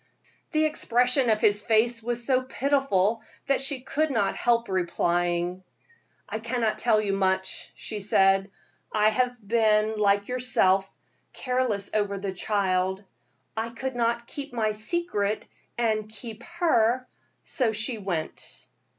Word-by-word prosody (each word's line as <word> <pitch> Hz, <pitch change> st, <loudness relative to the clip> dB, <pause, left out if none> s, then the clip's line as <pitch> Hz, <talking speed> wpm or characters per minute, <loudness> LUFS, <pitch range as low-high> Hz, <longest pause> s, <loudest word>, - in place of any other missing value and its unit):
The 310 Hz, -1 st, +2 dB
expression 250 Hz, -3 st, +2 dB
of 215 Hz, -1 st, +2 dB
his 205 Hz, 0 st, +3 dB
face 230 Hz, +2 st, +2 dB
was 240 Hz, +1 st, -3 dB
so 260 Hz, -1 st, +3 dB
pitiful 255 Hz, -6 st, +1 dB, 0.2 s
that 275 Hz, -1 st, +1 dB
she 270 Hz, -1 st, -2 dB
could 310 Hz, +4 st, 0 dB
not 225 Hz, -7 st, 0 dB
help 235 Hz, -1 st, +1 dB
replying. 175 Hz, 0 st, 0 dB, 0.6 s
"I 220 Hz, -, -4 dB
cannot 230 Hz, -1 st, -1 dB
tell 220 Hz, -3 st, +3 dB
you 205 Hz, -2 st, -1 dB
much," 190 Hz, -1 st, -1 dB
she 215 Hz, -, -5 dB
said. 195 Hz, 0 st, +3 dB, 0.4 s
"I 215 Hz, 0 st, +4 dB
have 245 Hz, +3 st, 0 dB
been, 215 Hz, -1 st, +2 dB
like 200 Hz, -1 st, +2 dB
yourself, 195 Hz, -7 st, +2 dB, 0.4 s
careless 250 Hz, -6 st, -1 dB
over 205 Hz, -2 st, 0 dB
the 195 Hz, 0 st, -3 dB
child. 190 Hz, -1 st, 0 dB, 0.5 s
I 225 Hz, +1 st, -2 dB
could 260 Hz, +2 st, -5 dB
not 235 Hz, 0 st, 0 dB
keep 280 Hz, +1 st, -7 dB
my 220 Hz, -3 st, +1 dB
secret 215 Hz, -, -1 dB, 0.3 s
and 215 Hz, -3 st, 0 dB
keep 220 Hz, +1 st, -9 dB, 0.2 s
her, 255 Hz, -7 st, +3 dB, 0.4 s
so 245 Hz, -5 st, 0 dB
she 220 Hz, +2 st, -2 dB
went." 175 Hz, -6 st, -5 dB
220 Hz, 135 wpm, -26 LUFS, 200-245 Hz, 0.6 s, I